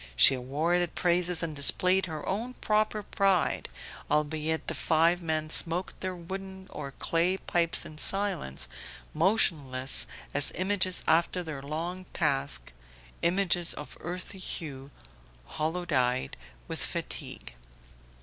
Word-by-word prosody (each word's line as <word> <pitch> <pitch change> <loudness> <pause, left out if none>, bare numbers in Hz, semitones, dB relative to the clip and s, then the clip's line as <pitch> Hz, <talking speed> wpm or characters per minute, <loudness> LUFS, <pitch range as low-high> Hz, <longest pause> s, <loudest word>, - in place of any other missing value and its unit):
She - - +9
awarded 155 +7 -1
praises 175 -1 +1
and 160 -2 -3
displayed 185 +6 +4
her 155 -2 -6
own 230 +6 -3
proper 215 0 0
pride, 195 -3 +1 0.4
albeit 155 +1 0
the - - -2
five 165 +2 +2
men 155 -2 -2
smoked 175 +3 +3
their 185 -1 -3
wooden 190 +2 -8
or 140 -2 -7
clay 170 +6 0
pipes 170 -3 +1
in 155 0 -9
silence, 195 - +2 0.5
motionless 150 -8 +2 0.3
as 145 0 +2
images 185 -1 +1
after 170 +2 +2
their 155 -4 -6
long 170 +6 -5
task; 140 - -1 0.5
images 175 -1 +1
of 150 - -9
earthy 180 +3 -6
hue, 140 -7 -7 0.6
hollow 160 - -3
eyed 125 - +1 0.3
with - - -5
fatigue. 65 -1 -5
170 Hz, 120 wpm, -28 LUFS, 150-185 Hz, 0.6 s, She